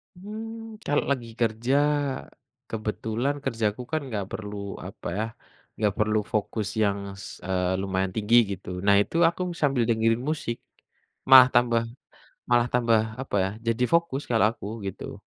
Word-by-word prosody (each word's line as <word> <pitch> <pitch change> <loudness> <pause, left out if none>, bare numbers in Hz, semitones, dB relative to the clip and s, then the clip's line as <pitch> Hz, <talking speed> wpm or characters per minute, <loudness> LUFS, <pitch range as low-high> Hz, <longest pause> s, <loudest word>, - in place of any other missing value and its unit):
Mmm, 220 +3 -8
kalau 145 - +2
lagi 120 -4 -1
kerja? 115 +4 +1 0.9
Kebetulan 110 +5 -2
kerjaku 110 0 -1
kan 155 -1 0
nggak 105 -5 -3
perlu, 105 -1 -5 0.3
apa - - -8
ya, 110 - 0 0.5
nggak 105 -3 +1
perlu 110 0 +2 0.2
fokus 105 -1 -1 0.2
yang 100 -1 +1 0.2
s - - -8 0.2
eee, 90 -1 0
lumayan 95 -1 -1
tinggi 110 +2 +2 0.2
gitu. 95 0 -9 0.2
Nah 100 0 +6
itu, 135 - -5
aku 175 - -2 0.2
sambil 135 -5 +3
dengerin 115 +1 +2
musik. 120 -7 -2 0.7
Malah 130 -1 +11
tambah 120 -1 +4 0.7
malah 120 0 +4
tambah, 115 -2 +4 0.2
apa 130 - -4
ya, - - -1 0.2
jadi 115 +2 +1
fokus 170 -4 +2
kalau 115 -2 +4
aku, 105 -3 -9 0.2
gitu. 95 - -7
115 Hz, 145 wpm, -26 LUFS, 105-130 Hz, 0.9 s, Malah